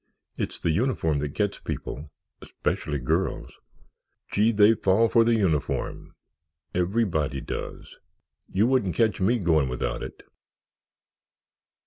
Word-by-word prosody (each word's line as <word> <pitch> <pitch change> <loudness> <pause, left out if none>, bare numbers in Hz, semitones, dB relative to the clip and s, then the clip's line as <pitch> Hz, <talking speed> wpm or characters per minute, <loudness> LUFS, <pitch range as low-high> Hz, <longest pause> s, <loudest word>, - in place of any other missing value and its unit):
"It's - - -4
the 85 - +1
uniform 80 - +1
that 75 0 -4
gets 100 -1 -1
people—specially 75 0 -5
girls. - - -1 0.8
Gee, 110 +3 +3
they 105 0 +6
all 115 - 0
fall 100 +5 +3
for 115 - +5
the 115 0 +3
uniform—everybody 80 - -2
does. - - -7 0.5
You 100 +4 +3
wouldn't 125 -8 +1
catch 110 -4 +2
me 115 +6 +3
going 80 - +2
without 60 - -3
it." - - -8
95 Hz, 110 wpm, -26 LUFS, 75-110 Hz, 0.8 s, they